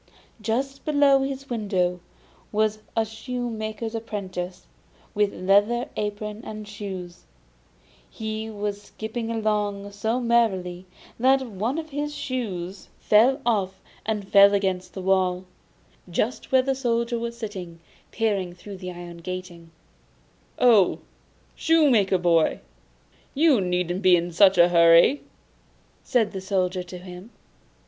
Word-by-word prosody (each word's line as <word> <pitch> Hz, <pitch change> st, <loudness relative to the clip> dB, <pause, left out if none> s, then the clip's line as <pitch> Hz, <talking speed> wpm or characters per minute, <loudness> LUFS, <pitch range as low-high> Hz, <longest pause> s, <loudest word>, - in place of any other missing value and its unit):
Just 265 Hz, +6 st, -2 dB
below 285 Hz, -2 st, +4 dB
his 270 Hz, 0 st, -4 dB
window 190 Hz, -7 st, -1 dB, 0.5 s
was 215 Hz, 0 st, +1 dB, 0.2 s
a 225 Hz, -, +3 dB
shoemaker's 220 Hz, -1 st, -5 dB
apprentice, 190 Hz, -5 st, -5 dB, 0.5 s
with 205 Hz, -1 st, +1 dB
leather 205 Hz, +6 st, +2 dB
apron 210 Hz, +1 st, -4 dB
and 215 Hz, -1 st, -8 dB
shoes; 190 Hz, -4 st, -8 dB, 0.8 s
he 220 Hz, 0 st, -5 dB
was 205 Hz, -1 st, -4 dB
skipping 220 Hz, +2 st, -6 dB
along 210 Hz, -3 st, -1 dB
so 220 Hz, +4 st, -1 dB
merrily 190 Hz, -7 st, 0 dB, 0.3 s
that 265 Hz, +2 st, +4 dB
one 225 Hz, +5 st, -3 dB
of 315 Hz, -1 st, -5 dB
his 295 Hz, +1 st, -3 dB
shoes 200 Hz, -10 st, -4 dB
flew 240 Hz, +6 st, +4 dB
off 195 Hz, -5 st, 0 dB, 0.2 s
and 210 Hz, -3 st, -3 dB
fell 200 Hz, 0 st, +7 dB
against 185 Hz, -2 st, -2 dB
the 190 Hz, -, -5 dB
wall, 185 Hz, -1 st, +1 dB, 0.6 s
just 215 Hz, +8 st, -2 dB
where 260 Hz, -1 st, +5 dB
the 270 Hz, +1 st, 0 dB
Soldier 235 Hz, -2 st, -1 dB
was 235 Hz, 0 st, -5 dB
sitting 190 Hz, -7 st, -7 dB, 0.3 s
peeping 200 Hz, -6 st, -1 dB
through 195 Hz, +2 st, -10 dB
the 180 Hz, -1 st, -7 dB
iron 175 Hz, -1 st, -9 dB
grating. 180 Hz, -1 st, -7 dB, 0.9 s
'Oh, 220 Hz, -7 st, +5 dB, 0.6 s
shoemaker's 245 Hz, -, +3 dB
boy, 170 Hz, -2 st, +3 dB, 0.8 s
you 290 Hz, -6 st, +4 dB
needn't 180 Hz, 0 st, -1 dB
be 185 Hz, -2 st, +6 dB
in 175 Hz, 0 st, -1 dB
such 190 Hz, +2 st, +5 dB
a 175 Hz, 0 st, +6 dB
hurry!' 170 Hz, +10 st, +6 dB, 0.8 s
said 230 Hz, -4 st, +1 dB
the 190 Hz, -, -6 dB
Soldier 185 Hz, -1 st, -1 dB
to 180 Hz, 0 st, -9 dB
him. 180 Hz, +3 st, -11 dB
210 Hz, 125 wpm, -24 LUFS, 185-235 Hz, 0.9 s, fell